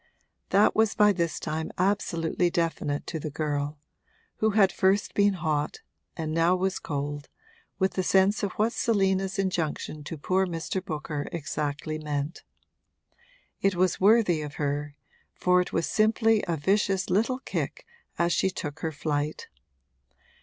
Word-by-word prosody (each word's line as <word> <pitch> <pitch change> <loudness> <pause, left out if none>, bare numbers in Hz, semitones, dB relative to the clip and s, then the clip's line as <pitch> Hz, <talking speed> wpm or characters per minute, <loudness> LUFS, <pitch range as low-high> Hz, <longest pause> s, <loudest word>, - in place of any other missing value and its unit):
That 200 +2 +4
was 220 -2 +3
by 210 0 +6
this 170 -3 -1
time 160 +1 -3
absolutely 180 -3 +1
definite 165 -4 -1
to 160 - -4
the 155 - -4
girl, 145 0 -2 0.6
who 220 - +2
had 200 -3 +4
first 195 +3 +1
been 200 0 +3
hot 155 -4 -2 0.4
and 155 -2 -3
now 165 +2 +3
was 190 +1 -1
cold 145 0 -4 0.5
with 190 0 +1
the 185 - 0
sense 195 +2 +3
of 200 -3 -2
what 220 +3 +1
Selina's 195 -3 +1
injunction 165 -5 -2
to 160 - -5
poor 185 +6 +1
Mr. 175 +2 -3
Booker 150 -4 -4
exactly 155 -1 -3
meant. 150 +1 -3 1.2
It 195 -1 +2
was 185 0 +1
worthy 200 -5 +4
of 150 -1 -6
her, 145 0 -2 0.4
for 180 0 +3
it 180 - -4
was - - 0
simply 220 0 +3
a 170 -2 0
vicious 195 +4 +1
little 230 +7 +2
kick - - -4 0.3
as 170 0 +2
she 190 - +2
took 160 -4 -6
her 160 - -2
flight. 150 0 -3
175 Hz, 145 wpm, -27 LUFS, 155-195 Hz, 1.2 s, by